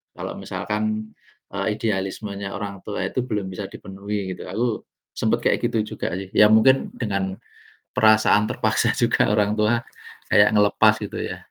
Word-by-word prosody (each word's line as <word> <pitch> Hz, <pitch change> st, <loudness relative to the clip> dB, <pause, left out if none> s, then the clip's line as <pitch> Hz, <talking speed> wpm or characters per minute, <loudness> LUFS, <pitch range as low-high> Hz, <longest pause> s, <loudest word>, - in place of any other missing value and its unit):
kalau -, -, -5 dB
misalkan, 110 Hz, +1 st, -3 dB, 0.4 s
e 100 Hz, -, -6 dB, 0.2 s
idealismenya 100 Hz, -1 st, -3 dB
orang 100 Hz, -2 st, -5 dB
tua 105 Hz, -, -3 dB
itu 130 Hz, -, -2 dB
belum 105 Hz, -6 st, -2 dB
bisa 95 Hz, +1 st, -5 dB
dipenuhi 100 Hz, 0 st, -5 dB
gitu, -, -, -10 dB
aku 115 Hz, -1 st, -2 dB, 0.3 s
sempet -, -, +1 dB
kayak -, -, +2 dB
gitu 115 Hz, -2 st, -1 dB, 0.2 s
juga -, -, -2 dB
sih. 95 Hz, -1 st, -8 dB
Ya 105 Hz, -, +7 dB
mungkin 130 Hz, +5 st, +4 dB
dengan 100 Hz, -4 st, -2 dB, 0.6 s
perasaan 110 Hz, -1 st, +5 dB
terpaksa 110 Hz, -1 st, +1 dB
juga 120 Hz, -2 st, +2 dB
orang 105 Hz, 0 st, +2 dB
tua 115 Hz, +2 st, +2 dB, 0.5 s
kayak 105 Hz, 0 st, +6 dB
ngelepas, 105 Hz, -1 st, +5 dB
gitu -, -, -5 dB
ya. -, -, -4 dB
105 Hz, 150 wpm, -23 LUFS, 100-110 Hz, 0.6 s, Ya